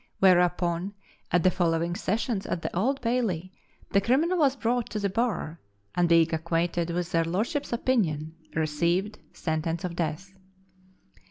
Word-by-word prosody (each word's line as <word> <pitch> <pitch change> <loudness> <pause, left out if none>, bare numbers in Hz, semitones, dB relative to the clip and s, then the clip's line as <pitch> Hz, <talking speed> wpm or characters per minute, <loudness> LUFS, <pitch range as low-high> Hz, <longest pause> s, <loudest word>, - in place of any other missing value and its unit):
Whereupon, 180 0 +3 0.3
at 175 -2 +2
the 185 - +5
following 170 -1 +1
sessions 215 +2 -1
at 170 - -3
the - - -4
Old 260 +10 +1
Bailey, 220 -8 -1 0.4
the 200 - +4
criminal 315 - +2
was 280 -3 +4
brought 245 -1 0
to 215 - -3
the 200 -2 -1
bar, 190 -8 -1 0.3
and 175 -1 +2
being 165 -1 +4
acquainted 170 +1 0
with 175 0 -2
their 165 0 +3
lordships' 220 - -2
opinion, 170 - 0 0.2
received 170 +6 0
sentence 160 0 -2
of 175 -2 -3
death. 170 +3 -3
180 Hz, 145 wpm, -27 LUFS, 165-220 Hz, 0.4 s, the